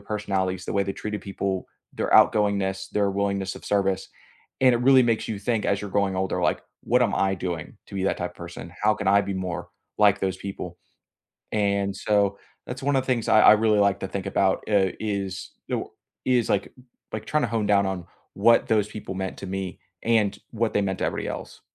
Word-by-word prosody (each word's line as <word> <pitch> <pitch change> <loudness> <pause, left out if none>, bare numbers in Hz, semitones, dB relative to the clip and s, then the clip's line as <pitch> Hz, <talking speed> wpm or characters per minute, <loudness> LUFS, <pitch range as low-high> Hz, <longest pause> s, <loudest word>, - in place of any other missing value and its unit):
personalities, 95 -3 -2
the - - -4
way 100 - +2
they 95 0 -3
treated 105 0 -5
people, 95 -1 -3 0.3
their - - -2
outgoingness, 95 -2 +3
their 100 -1 +1
willingness 100 -1 -1
of - - -11
service. 95 -2 0 0.5
And 130 -2 +6
it - - +1
really 130 +1 +6
makes 115 -2 0
you 110 - -3
think 105 +1 -1
as 100 0 +1
you're 105 - -5
growing 100 -1 +1
older, 95 0 -1
like, - - +1 0.2
"What 125 +2 +2
am 120 - +1
I 95 0 +2
doing 85 -3 -5
to - - -12
be 95 - -2
that - - +1
type - - -3
of - - -28
person? - - -9
How 105 0 +4
can 100 - -5
I 100 +1 +6
be 100 -1 -3
more 90 -2 -4 0.3
like 105 -1 +5
those 95 -1 -1
people?" 95 -3 -7 0.8
And 100 -2 +1
so, 100 -1 +1 0.3
that's 130 +2 -6
one 140 0 +2
of 130 - +1
the - - -15
things 120 -3 0
I 110 - +6
I - - +9
really 110 -1 +3
like 100 -1 +3
to 95 - -2
think 100 -2 -4
about, 95 -1 +2
uh, 95 -3 +3
is 100 -3 -3 0.2
the - - -1 0.4
is 125 -3 +2
like - - 0 0.4
like 110 - -4
trying 150 -1 +1
to - - +1
home 110 -2 0
down 100 -1 +4
on 95 -3 -3 0.3
what 115 0 +4
those 105 -2 +2
people 105 -3 -7
meant 95 -1 -4
to 95 - -7
me, 95 -1 -4 0.2
and 110 -3 +2
what 115 -1 -1
they 105 - +2
meant 95 -1 -2
to - - +1
everybody - - -2
else. - - -7
100 Hz, 220 wpm, -25 LUFS, 95-110 Hz, 0.8 s, I